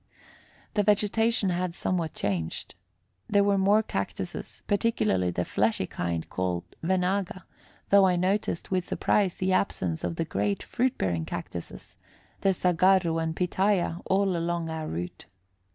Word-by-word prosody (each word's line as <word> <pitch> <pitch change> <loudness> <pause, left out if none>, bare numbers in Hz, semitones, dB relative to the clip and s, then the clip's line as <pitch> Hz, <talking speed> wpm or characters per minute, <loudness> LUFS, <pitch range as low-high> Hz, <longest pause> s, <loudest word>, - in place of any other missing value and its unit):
The 210 - +3
vegetation 210 0 +2
had 175 -1 -2
somewhat 170 -4 -1
changed. 90 -6 -3 0.6
There 200 -1 +4
were 200 -1 +3
more 205 +3 +4
cactuses, - - -5
particularly 110 - +1
the 90 0 -1
fleshy 105 -2 +1
kind 85 -2 -3
called 90 -2 -2 0.2
venaga, 185 +1 0 0.5
though 200 -1 +7
I 180 - +3
noticed 185 0 -1
with 185 -1 +1
surprise 190 0 +1
the 185 0 0
absence 90 - 0
of - - -2
the 165 - -1
great 100 -7 -1
fruit 255 +1 0
bearing 85 -4 -1
cactuses, 85 +1 -7 0.4
the 195 - +3
saguarro 180 -1 +3
and 160 0 -2
pitaya, 180 -1 +1
all 195 -1 +2
along 170 -1 -1
our 160 -1 -4
route. 90 +2 -5
180 Hz, 135 wpm, -27 LUFS, -, 0.6 s, though